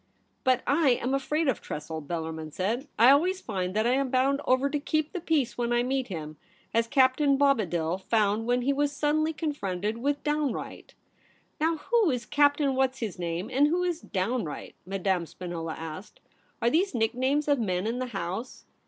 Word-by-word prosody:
' - - -44
But 255 -1 +2
I 285 -3 +4
am 255 +2 -1
afraid 300 +3 0
of 265 - 0
Tressel,' 155 +1 -5
Bellarmin 160 0 -5
said; 225 - -2
* - - -42
I 235 +4 +8
always 360 +7 +3
find 185 - -3
that 215 +1 +2
I 240 - +3
am 270 +1 +1
bound 270 +2 +2
over 260 +2 +3
to 290 +1 -1
keep 310 +1 -1
the 365 - -3
peace 310 -8 0
when 240 0 0
I 240 0 +3
meet 260 0 -1
him, 155 -5 -6 0.4
as 230 0 +2
Captain 275 +2 +3
Bobadil 185 - +1
found 215 0 +1
when 245 0 +2
he 280 +3 +2
was 285 +1 +1
suddenly 300 +2 +1
con 310 -1 -2
fronted 200 -2 -3
with 285 +3 -1
Downright.' 295 -3 -3 0.3
' - - -29
Now 325 +1 +2
who 450 +4 +2
is 250 -4 -2
Captain 285 +1 +3
What's 265 0 +1
his 215 -8 -5
name, 170 +3 -3
and 280 +3 +5
who 350 +4 +1
is 350 -2 -1
Downright 190 -3 -3
?' - - -43
Madame 190 -3 -1
Spinola 170 -2 -5
asked. 165 +5 -8 0.2
' - - -38
Are 235 - +3
these 350 +1 +1
nicknames 260 +6 +1
of 285 -2 +3
men 185 -4 -1
in 235 +3 -1
the 255 - -2
House 215 +2 -5
255 Hz, 200 wpm, -28 LUFS, 195-285 Hz, 0.4 s, I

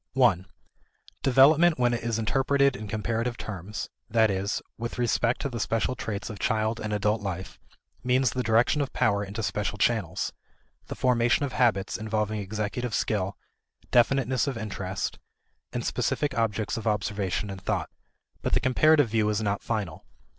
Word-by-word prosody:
1. 110 -9 +3 0.7
Development 150 +6 +5
when 120 -1 +2
it 120 - -2
is 115 -1 -1
interpreted 135 +4 +2
in 110 -3 -7
comparative 115 +3 -2
terms, 100 0 -6 0.2
that 110 -1 +4
is, 95 +2 -1 0.2
with 115 +2 -5
respect 120 0 +1
to - - 0
the 120 -4 -5
special 115 +4 0
traits 105 -5 -4
of 105 - -9
child 110 +1 0
and 105 - -4
adult 105 +1 +1
life, 95 -2 -5 0.4
means 125 0 +2
the 125 - -1
direction 115 +5 +3
of 140 - -2
power 100 -2 +2
into 105 +3 -5
special 105 0 -2
channels: 105 -6 0 0.5
the - - -5
formation 120 +2 +2
of 130 - -6
habits 115 -7 +1
involving 110 -1 -1
executive 105 +4 -3
skill, 100 -2 -1 0.5
definiteness 130 +1 +3
of 135 -4 -2
interest, 100 -3 -4 0.5
and - - -3
specific 145 -1 0
objects 110 -1 0
of 115 - -4
observation 105 -1 -1
and 95 -1 -8
thought. - - -2 0.5
But - - -1
the - - +4
comparative 145 +1 +4
view 110 -1 +2
is 105 -1 0
not 100 -1 -1
final. 105 -9 -3
110 Hz, 160 wpm, -27 LUFS, 105-125 Hz, 0.7 s, Development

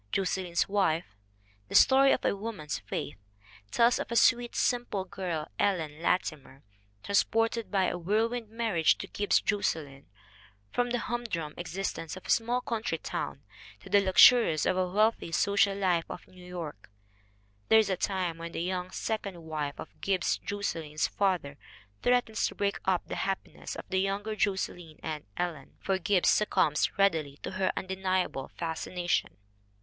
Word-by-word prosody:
Josselyn's 185 -2 0
Wife, 180 - 0 0.5
"the - - -6
story 270 0 +7
of - - +1
a - - +2
woman's 200 -8 -5
faith," - - -5 0.5
tells 235 - +3
of - - -5
a - - -1
sweet, 235 +1 +4
simple 240 -6 0
girl, 175 -6 -4
Ellen 160 -6 0
Latimer, 150 -6 -1 0.4
transported 225 +3 +1
by 195 -2 +2
a 180 -1 -1
whirlwind 220 +5 0
marriage 220 -8 +2
to - - -5
Gibbs 205 0 +2
Josselyn 155 -9 -2 0.7
from 245 0 +1
the 245 - 0
humdrum 225 -12 -3
existence 175 -1 -4
of 185 - -12
a - - -1
small 240 +2 +2
country 230 -2 -2
town - - -5 0.4
to - - -13
the 200 - +6
luxuries 190 -3 +6
of 185 - +2
the 185 0 +1
wealthy 210 -1 +1
social 200 +3 +2
life 180 -4 +1
of - - -8
New 180 -1 -15
York. 170 - -7 0.8
There 220 - +7
is 215 -3 +3
a - - +2
time 180 -3 -2
when 170 0 -7
the 165 - -2
young 180 0 -2
second 195 -4 -4
wife 150 -3 -4
of - - -10
Gibbs 190 -2 +1
Jos 205 0 -3
selyn's 155 -2 -2
father 180 -8 -1 0.4
threatens 245 -3 +2
to - - -8
break 200 0 -1
up 185 -2 +1
the - - -5
happiness 195 -1 -4
of - - -8
the 190 - +1
younger 200 +2 -2
Josselyn 180 -6 -2
and 155 -2 -4
Ellen, 170 -6 -4
for 190 -1 -1
Gibbs 185 +1 +3
succumbs 160 -7 +2
readily 160 -8 +2
to - - -4
her 190 0 0
undeniable 185 -6 -1
fascination. 175 +1 -2
190 Hz, 155 wpm, -29 LUFS, 165-205 Hz, 0.8 s, story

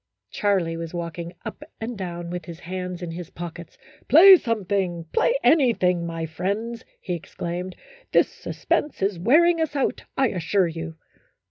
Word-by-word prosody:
Charlie 185 -6 0
was 165 +1 -6
walking 170 0 -5
up - - -6 0.2
and 230 +2 -4
down 175 -3 -5
with 175 -2 -5
his 170 -1 -9
hands 180 0 -5
in 170 - -4
his 170 0 -7
pockets. 170 0 -8 0.2
" - - -28
Play 370 - +10
something, 195 - -1
play - - +3
anything, 185 - +3
my 165 -1 -3
friends," 205 +8 -3 0.2
he 180 - -4
exclaimed. 175 +2 -5 0.4
"This - - +5
suspense 295 -9 -2
is 195 -3 0
wear 280 - +5
ing 340 -1 +2
us 315 -2 -1
out, 275 - 0
I 265 -3 +3
assure 185 +1 +1
you." 165 0 -6
180 Hz, 160 wpm, -24 LUFS, 170-230 Hz, 0.4 s, Play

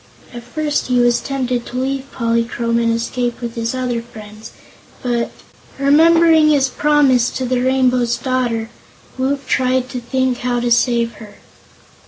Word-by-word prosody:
At 240 - -7
first 295 +5 -2
he 250 -1 +2
was 240 0 +3
tempted 255 -3 -2
to 250 - -6
leave 270 +1 -3
Polychrome 230 0 -1
and 230 0 +1
escape 240 +1 -2
with 235 -1 -5
his 230 +1 -3
other 250 -2 -2
friends, 215 -2 -12 0.5
but 240 -2 -1 0.5
remembering 320 +2 +5
his 275 -3 +3
promise 275 -5 +2
to 260 - -4
the 250 0 0
Rainbow's 250 -2 +1
Daughter 240 -3 -2 0.5
Woot 275 +2 -1
tried 255 0 0
to 250 - -5
think 260 +1 -1
how 245 -1 -1
to 240 0 -1
save 235 -1 +2
her. 210 -2 -12
250 Hz, 150 wpm, -18 LUFS, 235-265 Hz, 0.5 s, remembering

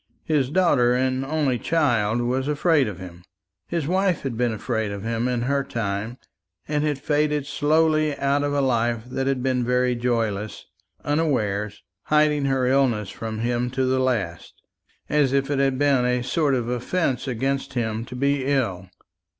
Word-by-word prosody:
His 145 -5 +1
daughter 145 -8 +3
and 130 +1 0
only 140 -3 0
child 120 -9 +1
was 130 +3 -1
afraid 150 -2 +2
of 100 -4 -5
him; 90 -2 -10 0.5
his 170 -4 -2
wife 185 +1 +1
had 135 -4 -3
been 120 0 +1
afraid 110 -1 -2
of 100 -1 -6
him 115 +1 -1
in 125 -2 -1
her 140 +2 +1
time, 110 0 -3 0.5
and 150 0 0
had 150 -2 0
faded 150 0 0
slowly 155 +1 +2
out 140 +1 +1
of 145 0 -1
a 145 0 +1
life 120 -3 +1
that 130 +1 -2
had 135 -2 0
been 130 -2 +1
very 125 +1 +1
joyless, 110 -4 -2 0.4
unawares, 105 -10 -1 0.2
hiding 150 -1 +3
her 135 -2 +1
illness 125 -6 +1
from 110 -1 -5
him 120 +1 0
to 130 +1 -1
the 130 0 +1
last, 110 -10 -2 0.4
as 145 -3 +2
if 140 +1 +1
it 140 - 0
had 135 -1 +2
been 140 -2 +3
a 125 0 +1
sort 140 +2 +1
of 120 -2 -2
offence 125 +3 -1
against 135 +2 -2
him 110 -2 -1
to 125 - -9
be 140 +1 +1
ill. 115 -10 -1
130 Hz, 170 wpm, -23 LUFS, 120-145 Hz, 0.5 s, daughter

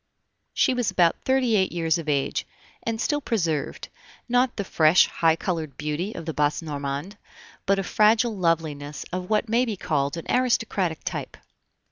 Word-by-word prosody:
She - - +3
was 245 -3 0
about 170 -2 +2
thirty 260 -4 +2
eight 190 -2 +2
years 165 -1 0
of 155 -2 -5
age, 140 -2 0 0.3
and 230 -1 -3
still 295 +4 0
preserved, 165 - -2 0.4
not 245 0 +2
the 200 - -2
fresh, 160 -2 +5
high 165 -1 +2
colored 160 -6 -3
beauty 150 +7 -3
of 165 - -6
the 160 - -3
Basse 150 +2 0
Normandes, 145 +5 -4 0.5
but 195 0 +3
a 195 - -1
fragile 220 +4 +3
loveliness 155 -5 -1
of 180 0 -4
what 215 +1 +1
may 230 +3 +2
be 225 -5 -3
called 145 -3 -1
an 165 - -6
aristocratic 225 - 0
type. - - -5
175 Hz, 165 wpm, -25 LUFS, 155-220 Hz, 0.5 s, fresh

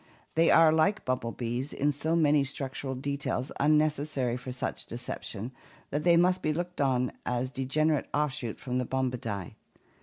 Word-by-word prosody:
They 165 +1 +4
are 165 -1 +7
like 160 +7 +2
bumblebees 125 +1 -2
in 145 +2 +1
so 155 +3 -1
many 150 -3 +4
structural 135 0 -4
details 140 -1 -2
un 150 +2 +5
necessary 145 -5 0
for 125 +1 -6
such 125 - -4
deception 120 -1 -5 0.4
that 145 +2 -1
they 170 -1 +5
must 180 +2 +3
be 155 - +1
looked 175 0 -3
on 125 -2 +2
as 125 +1 -1
a - - -31
degenerate 150 +3 +1
offshoot 135 -6 -1
from 125 -1 -2
the 125 - -1
Bombidae. 120 -8 -2
135 Hz, 160 wpm, -29 LUFS, 125-155 Hz, 0.4 s, are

